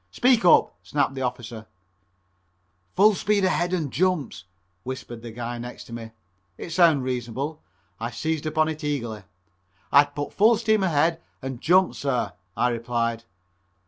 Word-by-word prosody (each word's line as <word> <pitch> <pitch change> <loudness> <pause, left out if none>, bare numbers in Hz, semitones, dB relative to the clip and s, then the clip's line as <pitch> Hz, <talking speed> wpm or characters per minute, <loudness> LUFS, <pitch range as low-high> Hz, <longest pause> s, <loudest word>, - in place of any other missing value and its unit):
"Speak 245 -3 +3
up!" 175 - +5
snapped 140 -2 0
the 135 - -5
officer. 120 -3 -5 1.3
"Full 210 +3 +6
speed 200 0 +1
ahead 175 -1 +1
and 160 -8 -2
jumps," 160 - 0 0.4
whispered 120 -2 -7
a 120 - -7
guy 120 +1 -5
next 120 +1 -8
to 115 - -12
me. 115 -1 -7 0.5
It 170 - -7
sounded 160 -5 +4
reasonable. 130 +4 -3 0.4
I 115 +1 -3
seized 155 +5 -2
upon 155 0 +2
it 155 -1 -5
eagerly. 120 -9 -3 0.7
"I'd 145 0 +5
put 145 0 -4
full 220 +3 +5
steam 220 -2 +2
ahead 165 -2 +2 0.2
and 130 -2 -5
jump, 185 +2 +4
sir," 125 -9 -2 0.2
I 125 - +3
replied. 115 -1 -2
145 Hz, 145 wpm, -25 LUFS, 120-170 Hz, 1.3 s, Full